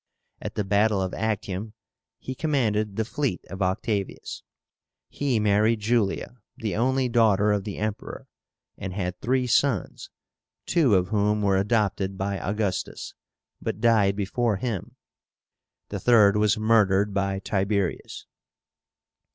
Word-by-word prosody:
At - - -6
the 105 - 0
battle 100 +1 +2
of 95 -1 -2
Actium 105 -1 -3 0.4
he 130 - -6
commanded 110 -9 0
the 110 - -1
fleet 140 - -2
of 95 +1 -6
Octavius. 95 +2 -2 0.7
He 135 -5 0
married 105 +2 +3
Julia, 115 +2 0 0.2
the 110 -3 -3
only 130 +3 +1
daughter 105 -4 +3
of 100 -2 0
the 105 - -5
Emperor, 105 0 -5 0.5
and 95 -1 -5
had 90 -2 -3
three 130 +1 +1
sons, 125 - 0 0.6
two 150 - +3
of 90 -1 +1
whom 105 0 +1
were 100 -1 +3
adopted 100 -2 0
by 100 0 -2
Augustus, 100 +1 -3 0.5
but 100 - -3
died 110 -4 +3
before 105 +3 0
him; 110 -4 -4 0.9
the - - -4
third 105 -4 +5
was 105 0 +2
murdered 105 -2 +3
by 95 0 0
Tiberius. 100 -1 -2
105 Hz, 125 wpm, -25 LUFS, 100-115 Hz, 0.9 s, third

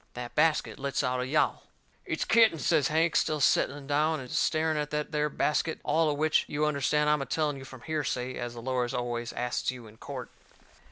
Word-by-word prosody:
That 120 -1 -6
basket 160 -2 +1
lets 140 +1 -1
out 125 -1 0
a 125 - -3
yowl. 150 +3 +1 0.5
"It's - - -1
kittens," 220 -10 +4
says 140 - +3
Hank, 160 +1 +1
still 155 -1 +2
setting 140 0 +2
down 150 +2 +1
and 125 -2 -9
staring 155 0 +1
at 150 -1 -2
that 150 0 -3
there 150 -1 0
basket. 150 +2 0
All 160 -1 +2
of 145 - -1
which, 155 +1 +3
you 150 +1 0
understand, 150 0 +1
I 150 - +5
am 150 - 0
a - - -2
telling 150 -3 0
you 135 - -9
from 130 -2 -12
hearsay, 130 -4 -2
as 120 0 -5
the 115 - -8
lawyers 125 -1 -1
always 120 -1 -3
asts 125 0 -2
you 125 -2 -6
in 110 0 -15
court. 130 -1 -7
145 Hz, 215 wpm, -29 LUFS, 125-155 Hz, 0.5 s, I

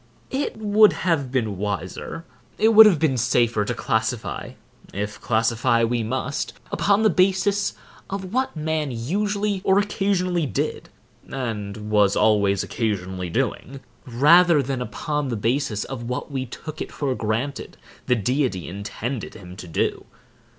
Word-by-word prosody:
It 270 -3 -2
would 215 0 +5
have 150 -8 +1
been 110 -7 -1
wiser, 100 - -4 0.3
it 220 - +4
would 220 -1 +10
have 190 -6 +4
been 150 -4 +1
safer, 120 -2 +2
to - - -2
classify 110 +1 -2 0.4
(if 105 +1 -4
classify 115 +1 +2
we 120 +1 +1
must) 130 +5 -3 0.2
upon 205 +2 +2
the 215 - +5
basis 195 +3 +2 0.3
of 190 0 -5
what 260 -4 0
man 155 -1 -1
usually 200 - -1
or 190 - +3
occasionally 190 -5 0
did, - - -3 0.4
and 105 -5 -4
was 105 -2 +4
always 100 -3 +3
occasionally 95 -5 -3
doing, 135 +10 -2 0.3
rather 150 +5 +5
than 130 -1 -3
upon 145 +6 -3
the 120 - -2
basis 115 -1 0
of 125 -3 -6
what 125 +3 -4
we 130 -2 -3
took 155 +6 -8
it - - -5
for 140 -3 -2
granted 120 +5 -3 0.3
the 125 - +4
Deity 125 - -1
intended 105 +6 -5
him 90 -1 -11
to 90 - -9
do. 80 - -1
130 Hz, 145 wpm, -23 LUFS, 110-175 Hz, 0.4 s, would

